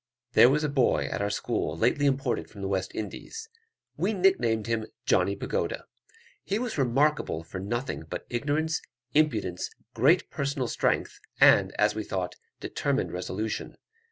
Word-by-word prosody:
There 120 Hz, -, +8 dB
was 150 Hz, +3 st, +2 dB
a -, -, +2 dB
boy 140 Hz, -4 st, +2 dB
at -, -, -2 dB
our 100 Hz, -, 0 dB
school 80 Hz, -6 st, -2 dB
lately 145 Hz, -, +2 dB
imported 135 Hz, -2 st, 0 dB
from 100 Hz, -3 st, -9 dB
the 95 Hz, 0 st, 0 dB
East 95 Hz, 0 st, -4 dB
Indies. 450 Hz, -, -6 dB, 0.5 s
We 220 Hz, -, +1 dB
nick 195 Hz, -1 st, +4 dB
named 110 Hz, -3 st, 0 dB
him 115 Hz, -1 st, -1 dB, 0.2 s
Johnny -, -, +3 dB
Pagoda. -, -, -2 dB, 0.6 s
He 200 Hz, -, -1 dB
was 245 Hz, 0 st, -3 dB
remarkable 135 Hz, -, +1 dB
for 85 Hz, +3 st, -7 dB
nothing 120 Hz, +7 st, -3 dB
but -, -, -5 dB
ignorance, 150 Hz, +6 st, -1 dB, 0.3 s
impudence, 110 Hz, -, +1 dB, 0.2 s
great 140 Hz, +10 st, +3 dB
personal 140 Hz, -3 st, -1 dB
strength, -, -, 0 dB, 0.2 s
and, -, -, +6 dB
as 105 Hz, 0 st, +3 dB
we 110 Hz, -, -3 dB
thought, 90 Hz, -3 st, -3 dB, 0.3 s
determined -, -, -1 dB
resolution. 95 Hz, +4 st, -4 dB
120 Hz, 155 wpm, -28 LUFS, 105-150 Hz, 0.6 s, There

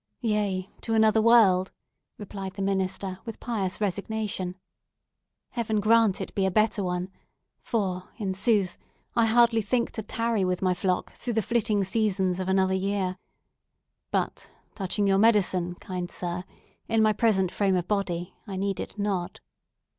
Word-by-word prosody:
"Yes, 210 Hz, -5 st, 0 dB, 0.2 s
to 225 Hz, -, -1 dB
another 220 Hz, 0 st, +4 dB
world," 210 Hz, -5 st, +5 dB, 0.5 s
replied 195 Hz, -2 st, -7 dB
the 195 Hz, -, -3 dB
minister 190 Hz, -1 st, -1 dB
with 225 Hz, -2 st, -7 dB
pious 200 Hz, -6 st, -2 dB
resignation. 200 Hz, -2 st, -2 dB, 1.0 s
"Heaven 220 Hz, -4 st, -1 dB
grant 220 Hz, -1 st, +4 dB
it -, -, -5 dB
be 195 Hz, -1 st, +1 dB
a -, -, +2 dB
better 215 Hz, +1 st, +2 dB
one; 180 Hz, +1 st, -2 dB, 0.5 s
for, 185 Hz, -6 st, -2 dB
in 205 Hz, -4 st, -3 dB
good 190 Hz, -, -3 dB
sooth, 205 Hz, -4 st, +1 dB, 0.4 s
I 230 Hz, -1 st, +4 dB
hardly 230 Hz, 0 st, +4 dB
think 235 Hz, +3 st, 0 dB
to 220 Hz, -, -4 dB
tarry 225 Hz, 0 st, 0 dB
with 180 Hz, -1 st, 0 dB
my 185 Hz, -1 st, +3 dB
flock 180 Hz, 0 st, -1 dB
through 240 Hz, -, -4 dB
the 220 Hz, -1 st, +1 dB
flitting 215 Hz, -2 st, +1 dB
seasons 190 Hz, -3 st, 0 dB
of 185 Hz, -, -3 dB
another 190 Hz, 0 st, +2 dB
year! 190 Hz, -1 st, -1 dB, 0.9 s
But -, -, -2 dB, 0.2 s
touching 200 Hz, +1 st, -1 dB
your 195 Hz, 0 st, +3 dB
medicine, 190 Hz, -5 st, +3 dB
kind 180 Hz, -1 st, -5 dB
sir, 175 Hz, +1 st, -4 dB, 0.4 s
in 225 Hz, -1 st, +3 dB
my 215 Hz, 0 st, +4 dB
present 195 Hz, -4 st, +2 dB
frame 195 Hz, -2 st, +1 dB
of 175 Hz, -1 st, -1 dB
body 180 Hz, -4 st, -2 dB
I 195 Hz, -2 st, -5 dB
need 195 Hz, 0 st, -1 dB
it -, -, -6 dB
not." 200 Hz, -4 st, -2 dB
200 Hz, 155 wpm, -27 LUFS, 185-220 Hz, 1.0 s, world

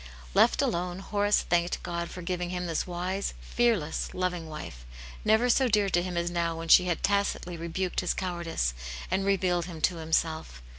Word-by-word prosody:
Left -, -, +4 dB
alone, 175 Hz, +1 st, -1 dB
Horace 205 Hz, +1 st, +1 dB
thanked 175 Hz, 0 st, 0 dB
God 170 Hz, 0 st, -3 dB
for 180 Hz, -, -8 dB
giving 180 Hz, 0 st, -2 dB
him 180 Hz, 0 st, -3 dB
this 165 Hz, 0 st, -1 dB
wise, 185 Hz, +3 st, -2 dB
fearless, 225 Hz, -11 st, 0 dB
loving 180 Hz, -3 st, -2 dB
wife, 70 Hz, -, -8 dB, 0.4 s
never 220 Hz, +3 st, +4 dB
so 255 Hz, +2 st, +4 dB
dear 205 Hz, -3 st, +3 dB
to 175 Hz, -, +3 dB
him 180 Hz, -1 st, -4 dB
as 170 Hz, 0 st, 0 dB
now 170 Hz, -1 st, -1 dB
when 165 Hz, 0 st, -6 dB
she 180 Hz, -, +8 dB
had 175 Hz, -3 st, -1 dB
tacitly 200 Hz, -3 st, 0 dB
rebuked 170 Hz, +2 st, -2 dB
his 180 Hz, -, 0 dB
cowardice 170 Hz, -, -2 dB, 0.4 s
and 190 Hz, +1 st, +1 dB
revealed 180 Hz, -3 st, +1 dB
him 170 Hz, -3 st, -8 dB
to 175 Hz, -, +2 dB
himself. 160 Hz, -, -1 dB
175 Hz, 180 wpm, -28 LUFS, 170-190 Hz, 0.4 s, she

